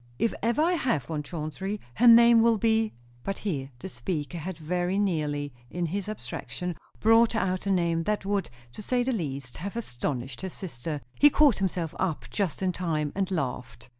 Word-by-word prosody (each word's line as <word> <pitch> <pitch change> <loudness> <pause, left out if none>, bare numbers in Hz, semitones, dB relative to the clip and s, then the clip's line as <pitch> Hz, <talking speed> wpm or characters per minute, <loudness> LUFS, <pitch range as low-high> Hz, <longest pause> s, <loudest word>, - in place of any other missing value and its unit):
"If 230 - +1
ever 235 +7 +2
I 340 - +3
have 200 - 0
one, 155 -2 -1
Chauncey, 170 +6 -4
her 240 - +4
name 235 0 +8
will 230 -1 +4
be 220 +1 +2 0.2
" 120 0 -28
But 195 - -3
here 140 -10 -3
the - - -7
speaker 150 +6 -4
had 180 +2 -5
very 175 +3 -1
nearly, 150 -8 0 0.2
in 175 +4 -2
his 195 +5 -3
abstraction, 175 - -5 0.2
brought 225 +1 +5
out 185 -2 0
a - - +2
name 170 -3 +2
that 210 -2 -1
would, 200 -2 0 0.2
to 170 - -9
say 245 +3 +1
the 260 - 0
least, 140 - -4
have 200 +6 -5
astonished 130 - -4
his 190 -2 -5
sister. 150 -3 -5 0.2
He 290 - +8
caught 290 -5 +4
himself 180 -4 -1
up 175 -5 -1
just 190 -3 -1
in 185 - +2
time, 160 -5 -1
and 195 -1 -1
laughed. 130 -8 -4
180 Hz, 190 wpm, -27 LUFS, 150-215 Hz, 0.2 s, name